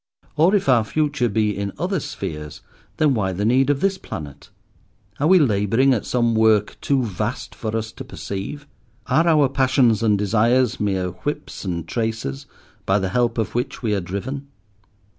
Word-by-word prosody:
Or, 165 +7 +4
if 195 - 0
our 125 -4 +5
future 140 0 0
be 105 -1 0
in 100 0 -3
other 185 +1 -1
spheres, 75 - -6 0.4
then 150 -3 +3
why 95 -5 0
the 100 +3 -2
need 130 +4 +3
of 145 -1 +1
this 195 -1 +1
planet? 70 -2 -8 0.7
Are 145 - +2
we 185 +2 +7
labouring 115 - +3
at 115 - -2
some 120 -2 +1
Work 110 -2 +3
too 135 -2 +1
vast 110 +2 -4
for 110 0 -3
us 110 0 -4
to - - -9
perceive? 100 +10 -6 0.4
Are 160 +6 +2
our 150 -4 +5
passions 130 -4 +2
and 105 -3 +3
desires 115 +4 +2
mere 95 -3 0
whips 145 - -5
and 85 -3 -3
traces 110 - -3 0.4
by 95 - +3
the 95 -2 -1
help 120 +3 0
of 110 - -1
which 120 +1 -3
we 110 -2 +1
are 100 - 0
driven? 125 +11 -5
115 Hz, 175 wpm, -22 LUFS, 100-135 Hz, 0.7 s, we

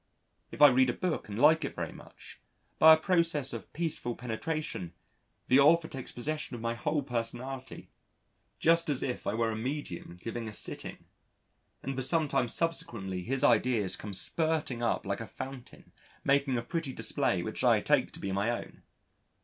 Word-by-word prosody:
If - - +1
I 145 - +11
read 130 0 +3
a - - 0
book 180 - -3
and 100 - -5
like 155 +5 +5
it 140 - -4
very - - -4
much, - - -14 0.4
by 160 0 +9
a - - -4
process 165 -5 +1
of - - -8
peaceful 155 -7 -1
penetration, 125 - -4 0.5
the 130 - +5
author 160 +3 +5
takes 135 -4 -7
possession 150 +1 -2
of 115 - -8
my 115 0 0
whole 145 +5 -1
personality 125 +1 -4 0.7
just 165 0 +3
as 140 -3 0
if 125 - -4
I 105 - 0
were 115 0 0
a - - -3
medium 110 - -5
giving 115 +3 -5
a - - -10
sitting, - - -4 0.8
and 135 0 -3
for 130 - -2
some 160 +4 +1
time 125 - +1
subsequently 110 - -3
his 130 +8 -2
ideas 115 -4 +3
come 100 -2 -5
spurting 155 - +2
up 120 - 0
like 100 +2 -3
a 115 - -6
fountain 130 -1 -9 0.3
making 140 -2 +2
a 115 - -2
pretty 160 +1 -3
display - - -1
which - - -4
I - - +5
take - - +1
to - - -6
be 100 - -4
my 100 +4 0
own. 120 - -5
130 Hz, 180 wpm, -30 LUFS, 115-155 Hz, 0.8 s, I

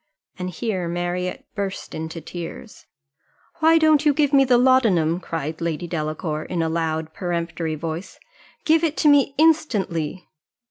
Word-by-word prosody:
And 180 0 -3
here 185 -1 -3
Marriott 175 +1 -3
burst 200 -1 -4
into 160 +1 -5
tears. 175 +7 -9 0.7
"Why 325 +1 +5
don't 310 -2 +4
you 295 -2 +3
give 290 -1 +2
me 275 -1 +7
the 250 -2 +4
laudanum?" 220 -11 +3
cried 165 -2 -5
Lady 165 0 -2
Delacour, 155 -1 -3
in 170 -2 -2
a 160 - 0
loud 160 -1 -2
peremptory 170 -2 -3
voice; 165 +3 -6 0.5
"Give 320 +1 +4
it 320 -2 0
to 305 - +2
me 280 -1 +4
instantly." 200 - +1
180 Hz, 145 wpm, -22 LUFS, 165-260 Hz, 0.7 s, me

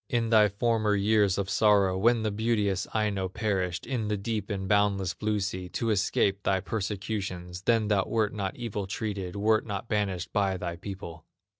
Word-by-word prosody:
In 120 -4 0
thy 105 -2 +6
former 110 0 +1
years 100 -1 +3
of 100 -1 -1
sorrow, 100 -2 +3
When 115 +4 +3
the 110 - 0
beauteous 105 -3 0
Aino 100 -3 0
perished 95 -5 -2
In 120 -4 -2
the 105 0 0
deep 105 0 -3
and 95 -2 -3
boundless 100 -2 +2
blue 105 -1 -1
sea, 95 -2 -4
To 115 +4 -1
escape 100 -1 +1
thy 95 -1 +1
persecutions, 95 -3 -4
Then 110 +1 +2
thou 105 -2 +2
wert 110 -2 0
not 100 -2 -3
evil 105 -5 -4
treated, 100 -3 -4
Wert 110 +2 +2
not 100 +1 -4
banished 100 -5 -2
by 100 -2 +1
thy 85 -1 -4
people." 85 -4 -8
100 Hz, 175 wpm, -28 LUFS, 95-110 Hz, -, thy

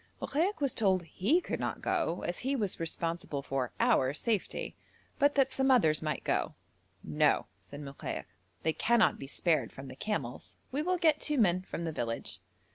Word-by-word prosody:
Mokaik 345 +8 0
was 275 -3 +2
told 190 -4 +2
he 210 - +2
could - - -3
not - - -2
go 170 +2 0
as 175 - -3
he 270 +3 0
was 210 -7 -1
responsible 165 -3 -2
for 135 -3 -2
our 215 - +3
safety, 215 +2 -1 0.4
but 285 0 +4
that 270 -2 +3
some 265 0 +2
others 160 -13 +4
might 155 -1 -2
go. - - 0 0.5
'No,' 75 -1 +2 0.2
said 145 +1 -10
Mokaik, 140 -1 -5 0.4
'they 160 - +2
cannot 235 +4 +3
be 135 - -7
spared 160 +3 +1
from 135 0 -9
the - - -9
camels; 140 - -4
we 280 +3 0
will 365 +3 +1
get 315 -4 +3
two 300 -1 0
men 185 -6 +3
from 175 -2 -6
the 165 - -2
village.' 115 -8 -4
185 Hz, 180 wpm, -31 LUFS, -, 0.5 s, but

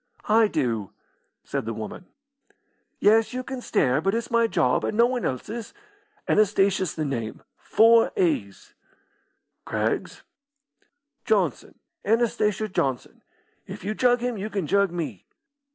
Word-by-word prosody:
"I 220 +1 +5
do," 115 - -2 0.5
said - - -4
the 115 0 -4
woman. 110 - -7 0.9
"Yes, 225 +3 +4
you 255 0 -3
can 260 -1 -6
stare, 145 - +1
but 195 +5 0
it's 235 +1 -3
my 230 0 +3
job, 125 - +1
and 210 - -2
no 235 - +6
one 245 -1 -1
else's. 215 - -5 0.5
Anastasia's 195 -4 +2
the 155 - -2
name 115 -6 -4
four 230 +1 +4
a's." 105 - -1 0.9
"Craggs?" - - -2 1.0
"Johnson 185 - 0 0.3
Anastasia 215 -2 +1
Johnson. 135 -10 -3 0.5
If - - -8
you 210 +3 -2
jug 245 +1 +2
him 245 -3 -2
you 210 +3 -4
can 195 -5 -2
jug 200 +4 +2
me." 170 -2 -6
200 Hz, 130 wpm, -25 LUFS, 150-230 Hz, 1.0 s, no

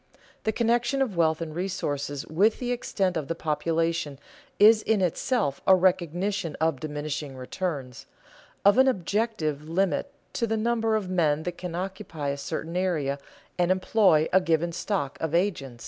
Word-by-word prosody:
The 220 - +2
connection 240 +4 +1
of 225 -8 -4
wealth 160 -1 +2
and 160 -2 -4
resources 145 -6 -3
with 200 +8 +2
the 245 -1 -3
extent 195 -6 -1
of 155 -4 -2
the 165 - -2
population 165 -1 -1 0.4
is 215 +1 +7
in 220 -1 +1
itself 185 - 0
a 190 - +8
recognition 180 -1 0
of 160 -4 +1
diminishing 150 -2 -4
returns, 130 -2 -5 0.6
of 205 +5 +6
an 265 - +6
objective 180 - -1
limit 190 +10 0 0.2
to 230 - -1
the 225 0 0
number 225 0 +1
of 210 -3 -1
men 160 -4 +1
that 175 0 -5
can 180 -2 -5
occupy 180 -5 -4
a 140 - -2
certain 160 +3 -5
area 155 -7 0 0.4
and 175 0 +3
employ 185 -4 +3
a 190 - +6
given 170 -1 +1
stock 165 -5 -3
of 160 0 -1
agents. 145 -10 -1
175 Hz, 160 wpm, -26 LUFS, 155-205 Hz, 0.6 s, a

